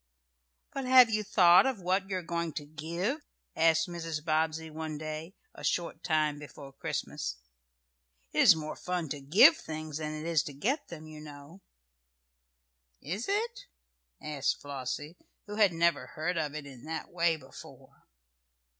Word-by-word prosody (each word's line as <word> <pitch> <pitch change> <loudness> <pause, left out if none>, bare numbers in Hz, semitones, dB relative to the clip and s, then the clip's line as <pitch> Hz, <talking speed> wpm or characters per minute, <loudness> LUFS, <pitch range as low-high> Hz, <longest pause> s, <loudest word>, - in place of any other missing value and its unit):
"But 270 -1 -3
have 255 -2 +8
you 215 0 +1
thought 185 0 +6
of 260 -6 -1
what 190 +2 0
you 190 - -1
are 180 - -5
going 170 -1 -2
to 145 - -5
give?" 170 - -3 0.3
asked 165 +1 +4
Mrs. 165 -3 -5
Bobbsey 160 0 0
one 155 -1 -5
day, 155 +4 -6 0.2
a - - -12
short - - -1
time 155 -3 +1
before 140 -2 -11
Christmas. - - -4 0.9
"It - - -1
is - - +8
more 155 -1 -5
fun 180 -4 -3
to 145 0 -4
give 155 +6 +7
things 155 -1 -6
than 155 -1 -3
it 155 +1 -6
is 165 -3 +3
to 145 - -6
get 235 - -1
them, 160 -2 -9
you 155 -1 -10
know." 150 +4 -12 1.4
"Is 190 +10 -4
it?" 450 +4 -2 0.5
asked 140 -3 -1
Flossie, 145 +3 -5 0.3
who 210 0 -7
had 205 -4 +5
never 165 -5 +1
heard 160 +7 -3
of 150 -3 -2
it 155 -2 -5
in 130 -4 -12
that 160 0 -5
way 170 -1 +2
before. 130 -3 -14
160 Hz, 160 wpm, -30 LUFS, 150-180 Hz, 1.4 s, have